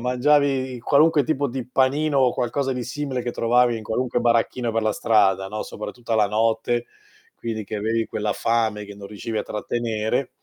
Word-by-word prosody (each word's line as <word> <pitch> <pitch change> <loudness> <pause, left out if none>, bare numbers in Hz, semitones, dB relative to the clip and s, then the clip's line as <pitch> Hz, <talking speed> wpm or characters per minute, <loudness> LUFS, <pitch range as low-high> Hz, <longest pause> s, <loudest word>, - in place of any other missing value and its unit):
mangiavi 130 0 +2
qualunque 150 +3 +4
tipo 140 -1 0
di 125 0 -5
panino 140 +3 +2
o 125 -2 +4
qualcosa 135 +3 -1
di 125 -1 -3
simile 130 -1 -3
che 120 - -2
trovavi 120 +1 +3
in 110 - -7
qualunque 120 +3 -1
baracchino 120 0 +1
per 115 0 0
la 110 - +1
strada, 95 -3 +2
no, 105 +1 -4
soprattutto 110 +3 -7
alla 110 -2 +4
notte, 115 +2 0 0.5
quindi 110 -2 -4
che 110 - -5
avevi 115 +2 0
quella 105 0 -2
fame 110 -2 0
che 100 - -10
non 100 0 -10
riuscivi 110 +2 -5
a - - -1
trattenere 115 +3 -2
120 Hz, 180 wpm, -23 LUFS, 110-130 Hz, 0.5 s, qualunque